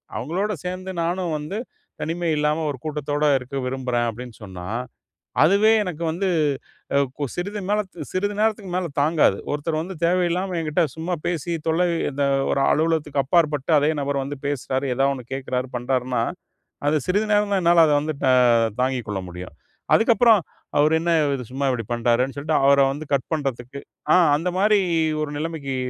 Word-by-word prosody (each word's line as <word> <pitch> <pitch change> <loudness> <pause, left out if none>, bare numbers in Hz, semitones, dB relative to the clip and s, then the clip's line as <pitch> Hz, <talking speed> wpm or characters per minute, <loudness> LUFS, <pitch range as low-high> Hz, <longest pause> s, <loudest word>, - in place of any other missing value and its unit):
அவங்களோடு 190 +9 -2
சேர்ந்து 185 +1 -4
நானும் 175 -1 -1
வந்து, 150 +8 -5 0.4
தனிமை 170 +1 -2
இல்லாம 150 +2 +1
ஒரு 140 - -4
கூட்டத்தோட 150 -1 -2
இருக்க 130 +2 -8
விரும்புறேன். 125 -2 -1
அப்டின்னு 120 +1 -9
சொன்னா, 90 -3 -8 0.8
அதுவே 200 +7 +5
எனக்கு 175 -4 -5
வந்து 180 +5 -2 0.7
அ - - +5 0.2
கு 145 - -1
சிறிது 200 +4 -4
மேல 210 +1 +2 0.3
சிறிது 205 +2 -1
நேரத்துக்கு 215 -3 0
மேல 185 -1 -1
தாங்காது. 155 +2 +3 0.2
ஒருத்தர் 155 +2 -2
வந்து 185 +4 -5
தேவையில்லாம 180 +1 +1
என்கிட்ட 160 +2 +1
சும்மா 170 +3 -2
பேசி, 170 -1 -2
தொல்லை 165 +2 +2 0.2
இந்த 140 +1 -1 0.3
ஒரு 140 - +1
அலுவலகத்துக்கு 155 -3 +1
அப்பாற்பட்டு, 150 -1 +1
அதே 145 +2 +2
நபர் 140 -1 -1
வந்து 145 +1 -5
பேசுறாரு, 135 -1 -2
ஏதாவது 135 +2 +2
ஒண்ணு 125 -3 -8
கேக்குறாரு, 130 -1 -3
பண்ணுறாருனா, 125 -1 -1 0.7
அது 155 +1 +3
சிறிது 205 +4 +1
நேரம் 205 0 +2
தான், 190 - +2
என்னால 170 -1 +6
அத 150 - +3
வந்து 155 0 -3 0.7
தாங்கிக்கொள்ள 120 -7 -1
முடியும். 90 -2 -9 0.4
அதுக்கு 235 +1 +4
அப்புறம் 230 -3 +6 0.4
அவரு 150 +2 +4
என்ன 170 +1 0 0.2
இது 125 - -5
சும்மா 135 +2 -2
இப்டி 115 -4 -3
பண்றாரேனு 120 +3 +1
சொல்லிட்டு, 150 +2 0
அவர 140 0 +6
வந்து 145 +3 -6
கட் 135 -2 0
பண்றதுக்கு 135 -3 -3 0.3
ஆ - - +7 0.2
அந்த 175 +3 -2
மாதிரி 210 +1 +4 0.4
ஒரு 150 - -2
நிலமைக்கு 150 -4 -4
150 Hz, 160 wpm, -23 LUFS, 135-175 Hz, 0.8 s, ஆ